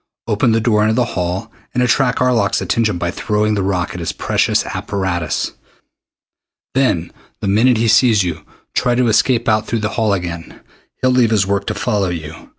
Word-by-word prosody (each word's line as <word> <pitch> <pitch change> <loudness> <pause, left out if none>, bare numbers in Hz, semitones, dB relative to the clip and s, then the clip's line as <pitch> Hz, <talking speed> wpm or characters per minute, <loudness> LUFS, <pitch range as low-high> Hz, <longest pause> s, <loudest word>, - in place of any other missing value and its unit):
Open 115 +2 +1
the 115 - +3
door 110 -2 +2
into 110 +1 +2
the 125 - +2
hall 90 +5 -3 0.2
and 125 - +2
attract 125 +2 +2
Arlok's 120 -6 +2
attention 110 -5 0
by 85 0 -2
throwing 105 +2 0
the 100 - 0
rock 90 -2 -1
at 90 - -6
his 85 - -2
precious - - 0
apparatus. 90 -5 -2 1.2
Then 125 -11 +1 0.3
the - - -3
minute 115 +5 +3
he 115 +1 +1
sees 110 -2 +4
you, 80 -4 -4 0.3
try 125 -1 +1
to 125 -1 +2
escape 120 +2 +2
out 110 -1 +2
through 115 -2 -1
the 110 - -1
hall 110 -2 0
again. 85 -3 -4 0.4
He'll 130 - +4
leave 125 -3 +3
his 105 -4 +2
work 100 +1 -1
to - - -2
follow 105 -6 0
you. 80 -2 -7
105 Hz, 185 wpm, -17 LUFS, 90-115 Hz, 1.2 s, sees